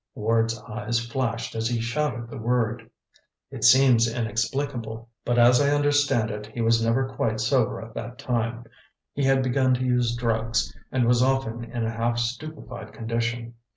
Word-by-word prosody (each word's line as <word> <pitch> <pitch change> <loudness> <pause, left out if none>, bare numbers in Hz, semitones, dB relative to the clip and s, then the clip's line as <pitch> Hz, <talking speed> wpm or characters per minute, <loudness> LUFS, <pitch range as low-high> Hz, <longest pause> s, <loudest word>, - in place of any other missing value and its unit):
Ward's 115 +1 +1
eyes 105 +2 -2
flashed 115 -1 -3
as 115 0 -1
he 120 0 -1
shouted 120 0 -2
the 135 - -8
word. 115 -1 -1 0.6
"It - - -7
seems 125 -3 +6
inexplicable; 115 0 -3
but 120 0 0
as 120 +2 +6
I 140 - +3
understand 145 -6 +2
it, 105 0 -6
he 110 +2 -9
was 115 0 +3
never 120 +4 +1
quite 125 -4 -2
sober 120 +1 +1
at 115 0 -10
that 120 +2 -6
time; 120 -3 -2 0.5
he 140 - -2
had 135 0 +3
begun 130 0 +2
to 130 +1 -2
use 125 -2 +1
drugs, 115 -2 -1 0.2
and 130 -2 +2
was 120 +1 +3
often 130 -3 0
in 115 -1 -3
a 110 - -1
half 115 +1 -1
stupefied 125 +2 -5
condition. 115 +1 -3
120 Hz, 165 wpm, -25 LUFS, 115-130 Hz, 0.6 s, seems